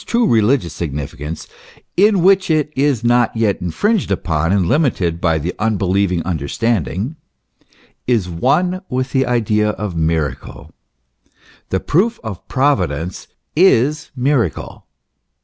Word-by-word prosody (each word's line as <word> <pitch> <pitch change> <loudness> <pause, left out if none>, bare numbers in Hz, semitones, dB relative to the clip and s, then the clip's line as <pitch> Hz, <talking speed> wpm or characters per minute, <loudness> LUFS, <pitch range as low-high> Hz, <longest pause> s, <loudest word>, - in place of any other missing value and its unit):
true 235 0 +1
religious 110 - +2
significance, 75 0 -5 0.5
in 200 -2 +4
which 190 0 +4
it 150 -1 +1
is 135 -4 +1
not 120 -1 +2
yet 110 -3 +1
infringed 185 - 0
upon 85 -4 0
and 100 -2 +2
limited 95 - +1
hy 80 -3 +2
the 80 +4 -3
unbelieving 100 -4 0
understanding 95 - -2 0.9
is 115 -7 +1
one 175 - 0
with 130 +1 -2
the 130 -2 +1
idea 105 -3 +1
of 105 -3 -4
miracle. 80 -2 -2 1.0
The 95 - 0
proof 215 +9 +1
of 110 -6 -7
Providence 90 - -1 0.3
is 150 -4 +3
miracle. 125 - -1
110 Hz, 115 wpm, -18 LUFS, 85-140 Hz, 1.0 s, in